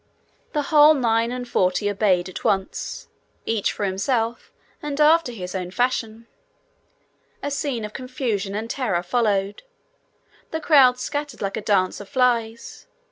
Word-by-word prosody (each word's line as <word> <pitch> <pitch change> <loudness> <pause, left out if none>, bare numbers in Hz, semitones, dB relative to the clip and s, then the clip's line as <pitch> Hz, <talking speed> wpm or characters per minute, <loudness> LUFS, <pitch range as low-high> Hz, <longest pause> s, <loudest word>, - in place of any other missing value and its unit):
The 295 -2 0
whole 300 +1 +8
nine 230 -3 +1
and 250 0 -5
forty 185 -1 +1
obeyed 195 -3 +1
at 185 - -8
once, 195 -4 -2 0.4
each 225 -3 0
for 205 - -3
himself, 225 +4 -1 0.3
and 295 -1 -4
after 310 -2 +4
his 185 -6 -7
own 180 -2 -4
fashion. 230 +1 -1 1.2
A 285 - -2
scene 275 -5 -2
of 210 - -9
confusion 235 -6 -3
and 220 +2 -3
terror 230 -9 -1
followed. 200 -1 0 0.9
The 320 - -3
crowd 275 -6 +5
scattered 290 -2 -4
like 195 - -2
a 220 - -3
dance 195 -3 +1
of 205 - -10
flies. 235 -4 -1
230 Hz, 140 wpm, -23 LUFS, 200-260 Hz, 1.2 s, whole